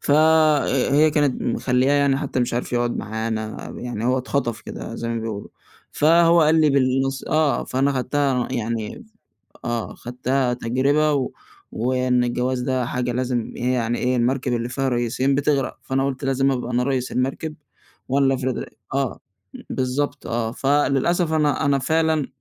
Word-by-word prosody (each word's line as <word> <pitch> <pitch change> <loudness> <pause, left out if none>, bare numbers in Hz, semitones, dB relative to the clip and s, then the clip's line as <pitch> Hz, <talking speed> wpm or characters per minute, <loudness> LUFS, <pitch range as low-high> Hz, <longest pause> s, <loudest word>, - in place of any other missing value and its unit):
ف - - -3
ه 155 -3 +4
هي 155 +2 +5
كانت 145 -3 +1
مخلّياه 125 +3 +1
يعني 140 -1 +3
حتى 135 -2 -2
مش 120 -1 -1
عارف 120 - -3
يقعد 120 0 0
معانا، 110 0 -4
ب - - -9
يعني 120 -2 -4
هو 130 +1 +2
اتخطف 125 -4 -2
كده 115 - -7
زَي 115 - -4
ما 115 -1 -2
بيقولوا. 110 -2 -5 0.4
فهو 170 +2 +5
قال 160 +1 +4
لي 155 -1 +4
بالنَص 135 0 +1
آه، 155 -5 +1
فأنا 135 +2 +1
خدتها 130 -1 0
يعني 115 - -3 0.6
آه 120 -1 -2
اخدتها 125 +1 -1
تجربة 135 +6 +1
و 135 -3 -1 0.4
وإن 125 0 +1
الجواز 125 +1 -1
ده 130 -1 0
حاجة 125 0 -2
لازم 125 -1 -2
إيه 125 +1 0
يعني 120 -1 0
إيه 125 +1 0
المركب 125 +1 0
اللي 120 0 -2
فيها 135 +2 -1
ريسين 125 +3 0
بتغرق. 140 -1 0
فأنا 135 +1 0
قُلت 135 0 -3
لازم 135 0 +2
أبقى 125 -2 -3
أنا 125 0 +1
ريس 130 -1 -1
المركب، 135 +5 -2 0.5
وأنا 140 +2 +2
اللي 135 - +3
أفرض 130 -1 -2
رأ - - -4 0.3
آه 135 -3 -1 0.5
بالضبط 130 +2 -2
آه. 115 -1 -1
فللأسف 145 +5 +1
أنا 150 -1 +1
أنا 140 -1 +3
فعلًا 160 +1 +1
130 Hz, 165 wpm, -22 LUFS, 125-140 Hz, 0.6 s, هي